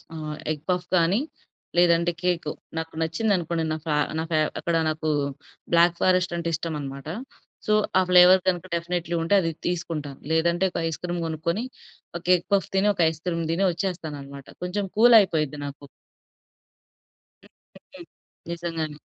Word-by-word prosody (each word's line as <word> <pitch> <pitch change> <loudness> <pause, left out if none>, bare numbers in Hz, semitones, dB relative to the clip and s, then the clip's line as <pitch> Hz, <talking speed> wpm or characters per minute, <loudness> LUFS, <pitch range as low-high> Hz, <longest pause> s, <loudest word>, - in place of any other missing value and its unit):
ఆహ్ 155 -1 -5 0.2
egg 150 -1 -8
puff 180 -1 0
గానీ, 175 +6 +3 0.6
లేదంటే 170 0 +4
కేకు, 175 -4 0 0.3
నాకు 160 0 -5
నచ్చిందనుకోండి, 170 -1 0
నాకు 155 +1 -6
ఆహ్, 150 - +1
నాకు 165 +1 -4
ఆహ్, 155 - +2
అక్కడ 170 - -1
నాకూ 155 0 -1 0.6
బ్లాక్ 170 0 +5
ఫారెస్టంటే 180 -2 +1
ఇష్టమనమాట. 145 -4 -4 0.6
సో, 215 - +2 0.3
ఆ - - +6
ఫ్లేవర్ 180 +1 +8
కనక 175 0 0
డెఫినెట్లీ 170 0 -3
ఉంటే 165 +5 +1
అది 165 -2 -1 0.2
తీసుకుంటాను. 165 -5 -3
లేదంటే, 170 +3 +2
ఒక - - -3
ఐస్‌క్రీమ్ 175 +2 -4
గొనుక్కొని, 170 +7 -2 0.5
ఒక 170 - -18
ఎగ్ 175 - -9
పఫ్ 195 -3 +1
తిని, 195 +2 +3
ఒక - - -6
ఐస్‌క్రీమ్ 165 +1 -3
దిని 185 +4 +1
ఒచ్చేస్తాననమాట. 150 -7 -5 0.2
కొంచం 195 +3 -2
కూలయిపోయిద్ది 190 - +5
నాకు. 140 0 -9 1.6
హ్మ్. - - -19 0.3
హ్మ్. - - -57
హ్మ్. - - -11 0.4
నిజంగానే. 165 -3 -4
170 Hz, 140 wpm, -25 LUFS, 155-180 Hz, 1.6 s, ఫ్లేవర్